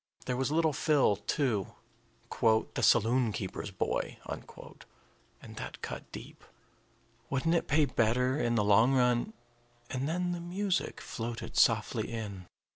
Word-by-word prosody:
There 125 - -1
was 130 +1 0
little 160 -1 +2
Phil, 140 -7 +3
too, 105 -2 -1 0.6
"the 110 -1 +2
saloon 115 +1 +4
keeper's 100 0 -5
boy," 95 - -2
and - - -5 1.1
that - - -7
cut - - -6
deep. - - -10 0.9
Wouldn't 140 +5 +1
it 170 - +1
pay 150 +1 +4
better, 125 +1 +1
in 120 -4 +1
the 105 - +2
long 110 +6 +5
run 125 - +2 0.6
and 135 +3 -2
then 175 +2 -1
the 175 -1 -4
music 185 +2 -2
floated 115 0 -6
softly - - +2
in. 100 -6 -6
125 Hz, 130 wpm, -31 LUFS, 110-150 Hz, 1.1 s, long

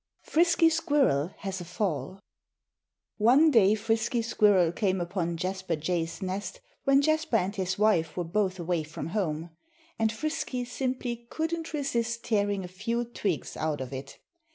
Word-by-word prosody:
II - - -18
Frisky 335 0 +5
Squirrel 275 - +1
has 190 -2 -4
a - - -4
Fall 180 -1 -3 1.0
One 265 +9 +5
day 215 -5 +5
Frisky 225 +2 0
Squirrel 205 -6 +4
came 190 0 0
upon 175 -1 -2
Jasper 185 0 -2
Jay's 165 +3 -2
nest 190 0 -4 0.3
when 275 +1 +5
Jasper 315 -3 +1
and 195 +1 -1
his 185 -2 -2
wife 200 -7 +2
were 175 - 0
both 190 +2 0
away 170 -1 0
from 155 +1 -6
home. 165 -4 -2 0.5
And 220 -1 +2
Frisky 255 -1 -3
simply 245 -2 -3
couldn't 325 +1 -3
resist 235 -5 -1
tearing 205 -3 0
a - - -5
few 230 +6 -2
twigs 200 -8 -3
out 155 -1 -1
of 130 0 -6
it. 135 +1 -7
205 Hz, 155 wpm, -28 LUFS, 175-240 Hz, 1.0 s, Frisky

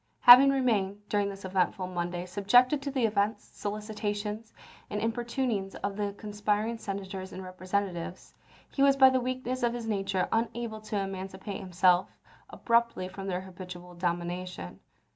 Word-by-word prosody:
Having 255 +3 +10
re 275 -1 +2
mained, 205 -5 +1
during 205 -1 +1
this 195 0 -8
eventful 185 +1 0
Monday, 175 -1 -3
subjected 245 +9 +3
to 280 - -3
the 265 -4 +1
visits, 210 0 0
solicitations, 210 +1 -4 0.4
and 210 - -2
importunings 230 -2 -2
of 200 -1 -2
the 205 -1 -2
conspiring 210 +2 -2
Senators 190 -2 -5
and 190 - -7
Kepresentatives, 185 -1 -4 0.4
he 275 - -2
was 275 0 +5
by 265 -1 +8
the 260 -1 +1
weakness 255 0 -3
of 240 0 +1
his 235 -1 -5
nature 195 -3 0
unable 225 -1 -2
to 215 -1 -4
emancipate 195 0 -5
himself 180 -1 +3 0.4
abruptly 235 -6 +1
from 195 +1 -7
their 185 -1 -2
habitual 180 -1 -10
domination. 175 - -4
205 Hz, 145 wpm, -29 LUFS, 185-230 Hz, 0.4 s, Having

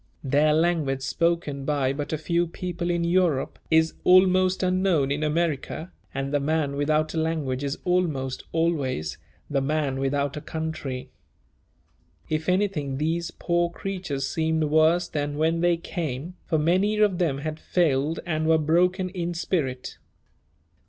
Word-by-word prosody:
Their 145 +3 +3
language, 155 -4 +1
spoken 160 -1 0
by 135 -2 0
but 145 +1 -4
a 155 - 0
few 170 +2 0
people 175 0 -4
in 170 -1 +1
Europe, 170 -5 +1
is 160 0 +3
almost 185 0 +5
unknown 185 -6 +2
in 145 +2 -1
America, 155 +1 -1 0.2
and 135 +1 -3
the 145 - +3
man 145 -1 0
without 155 +2 +1
a 165 - -1
language 150 -5 -1
is 140 0 -2
almost 155 -8 0
always 145 - -1 0.3
"the 140 -2 0
man 140 -1 -1
without 140 +1 0
a 150 - -5
country." 155 -6 -5 1.2
If 155 +2 -1
anything, 180 -8 0
these 165 +3 -1
poor 175 0 0
creatures 170 -7 -4
seemed 160 +1 0
worse 160 +3 +3
than 145 -1 -3
when 165 +2 +1
they 175 -1 +3
came, 165 -2 -4
for 160 - +1
many 185 +7 +2
of 205 -4 +3
them 160 -6 +1
had 155 +2 -4
failed 155 -3 +1
and 155 -2 -1
were 160 0 +5
broken 180 +4 +2
in 175 -2 -3
spirit. 135 -8 -2
160 Hz, 145 wpm, -25 LUFS, 145-175 Hz, 1.2 s, almost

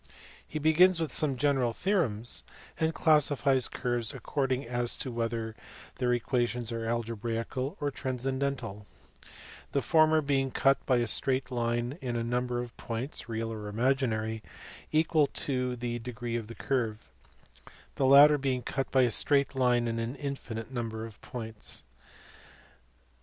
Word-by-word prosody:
He 155 - -5
begins 165 +4 +5
with 160 -2 -2
some 140 -4 +2
general 130 -3 +2
theorems, 120 - 0 0.4
and 160 0 +2
classifies 145 -5 +3
curves 120 -3 -2
according 135 -3 -1
as 120 0 -1
to 130 - -4
whether 115 -1 -2 0.4
their 125 -1 +1
equations 120 -1 0
are 115 -1 -3
alge 115 0 -2
braical 120 +4 -3
or 145 -1 -1
transcendental: 130 -5 -3 0.9
the 140 - +2
former 155 -1 +4
being 135 -1 +1
cut 135 +1 +2
by 130 - +4
a 120 - +1
straight 130 +3 +1
line 120 +4 -1
in 125 -3 -3
a 115 - -1
number 120 +1 -1
of 120 -1 -6
points 120 +2 -4
(real 115 0 -3
or 105 -1 -6
imaginary) 110 -1 0 0.5
equal 155 -1 +3
to 125 -3 -2
the 120 0 -3
degree 120 0 -5
of 115 -2 -3
the 115 - -9
curve, 115 -5 -2 0.9
the 135 - +1
latter 145 +2 +8
being 130 -2 -1
cut 135 +3 -2
by 130 -1 +4
a 120 - +2
straight 140 +3 +3
line 125 -2 +2
in 115 0 -2
an 115 +3 -3
infinite 130 -5 -5
number 115 -3 -4
of 110 -3 -12
points. 110 -3 -3
125 Hz, 145 wpm, -29 LUFS, 115-140 Hz, 0.9 s, latter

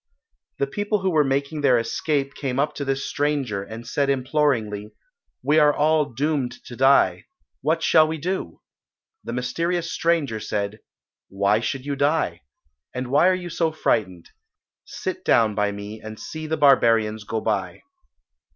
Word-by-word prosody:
The 140 - +1
people 205 +7 -2
who 190 -1 +1
were 155 -3 +4
making 140 +2 -1
their 130 -4 +4
escape 140 +4 -1
came 130 -3 -3
up 150 +2 +1
to 145 - -4
this 135 0 -2
stranger, 140 -8 -1
and 110 +4 -9
said 140 +3 0
imploringly, 130 -6 0 0.5
"We 150 +4 +4
are 150 -1 +6
all 155 0 +2
doomed 140 0 -1
to 120 - -9
die. 135 +2 +3 0.4
What 160 +3 0
shall 155 0 +5
we 160 +1 -3
do?" 170 - -4 0.6
The 115 - -5
mysterious 165 +7 -2
stranger 155 -10 0
said, 105 +1 -3 0.5
"Why 100 +2 +2
should 125 +3 -3
you 145 -1 -2
die? 140 - 0 0.5
and 125 0 -3
why 145 +6 +5
are 185 - +4
you 175 -1 -6
so 165 0 0
frightened? 95 - -1 0.5
Sit - - -5
down 110 -2 +3
by 105 0 0
me 100 +2 -8
and 110 0 -8
see 155 0 -6
the 160 +1 -1
barbarians 115 -7 +4
go 110 +1 -3
by." 100 -4 -2
135 Hz, 160 wpm, -23 LUFS, 110-155 Hz, 0.6 s, are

